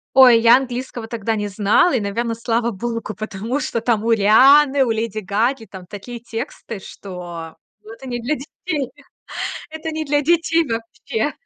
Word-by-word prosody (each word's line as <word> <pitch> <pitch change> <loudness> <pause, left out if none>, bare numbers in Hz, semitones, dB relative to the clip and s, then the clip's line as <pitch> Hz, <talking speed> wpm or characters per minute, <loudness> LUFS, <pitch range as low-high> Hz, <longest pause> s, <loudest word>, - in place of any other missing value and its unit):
Ой, 250 -3 +8
я 230 +2 +7
английского 250 -2 -5
тогда 225 -1 -2
не 205 -1 -2
знала. 210 - +3
И, - - +2
наверно, 230 +3 -2
слава 230 0 0
богу, 230 +2 -3
потому 215 +5 -3
что 230 - -2
там 230 -3 +1
у 230 - +2
Рианы, 265 +7 +6
у 235 - 0
Леди 225 -1 -2
Гаги 220 +5 -1
там 185 -3 -11
такие 235 +5 -8
тексты, 230 -1 -6
что, 175 -4 -9 0.3
ну 215 +1 -11
это 265 +4 -11
не 240 -1 -3
для 275 +6 0
детей. 285 -1 -5 0.8
Это 320 +1 -5
не 315 0 -3
для 290 0 +1
детей 330 +1 +2
вообще. 230 +1 -3
230 Hz, 170 wpm, -20 LUFS, 215-265 Hz, 0.8 s, Ой